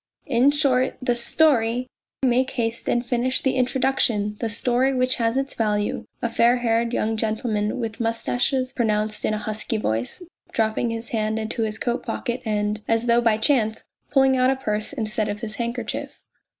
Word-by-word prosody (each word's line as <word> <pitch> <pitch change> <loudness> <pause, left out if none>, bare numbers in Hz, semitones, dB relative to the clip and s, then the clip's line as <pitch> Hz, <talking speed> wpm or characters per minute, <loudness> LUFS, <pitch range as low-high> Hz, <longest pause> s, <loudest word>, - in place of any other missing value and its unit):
" - - -45
In 250 +4 +5
short 275 -3 +2
the 250 -2 0
story 240 -2 +3 0.4
make 255 +1 +3
haste 230 -3 -2
and 240 +1 +1
finish 245 +1 0
the 265 - 0
introduc 260 +1 +1
tion. 210 -3 +1
The 230 - -1
story, 250 +4 +1
which 255 0 +2
has 230 +1 +1
its 270 0 -1
value," 210 -2 -1 0.2
a - - +2
fair 235 +1 +4
haired 230 -1 +1
young 220 -2 -1 0.2
man 210 -3 -1
with 225 -3 -4
moustaches 245 +3 0
pronounced 215 -2 -1
in 215 - +1
a - - -2
husky 215 +1 -3
voice, 120 - -2 0.3
dropping 220 +1 0
his 230 0 -4
hand 215 -1 -1
into 220 +1 -3
his 215 -1 -1
coat 240 +1 -2
pocket 245 -1 -3
and, 210 0 -1
as 225 +1 +1
though 235 0 +4
by 225 -2 +3
chance, 220 -2 +1 0.3
pulling 270 -1 +4
out 255 0 +3
a 270 - +2
purse 215 -5 -2
instead 220 -5 -2
of 205 0 -4
his 220 -1 -6
handkerchief. 235 +1 -4
235 Hz, 180 wpm, -23 LUFS, 220-255 Hz, 0.4 s, In